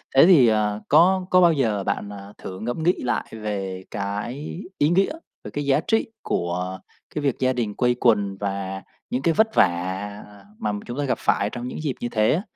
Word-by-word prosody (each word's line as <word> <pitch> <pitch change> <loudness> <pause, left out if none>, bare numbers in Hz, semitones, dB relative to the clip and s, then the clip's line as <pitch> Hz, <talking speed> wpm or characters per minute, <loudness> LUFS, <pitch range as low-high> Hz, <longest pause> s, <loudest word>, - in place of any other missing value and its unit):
thế 135 - +8
thì, 155 -10 +7
ờ, 105 -1 +1
có 180 +5 +5
có 185 0 +5
bao 170 -2 +6
giờ 110 -8 0
bạn, 100 - -2
ờ, 100 0 -10
thử 95 0 -8
ngẫm 120 +8 -3
nghĩ 180 +2 +4
lại 120 - 0
về 100 -4 -4
cái 110 - -4 0.2
ý 145 - +3
nghĩa, 190 - +3 0.3
về - - -8
cái 145 -1 -3
giá 140 +1 +3
trị 225 -1 +2 0.2
của 90 +2 -2 0.4
cái 150 - -1
việc 140 -4 +1
gia 130 0 +2
đình 110 -5 -2
quây 125 -1 +2
quần 100 -4 +2
và 95 -1 -3 0.3
những 125 - -1
cái 165 +3 +2
vất 220 +3 +2
vả 95 +3 0 0.4
mà 105 - -1
chúng 120 +3 -6
ta 145 - 0
gặp 135 - 0
phải 100 - +1
trong 120 +1 -6
những - - -6
dịp 140 -4 -1
như 120 - -3
thế 110 +2 +2
á 175 - 0
115 Hz, 210 wpm, -23 LUFS, 100-145 Hz, 0.4 s, thế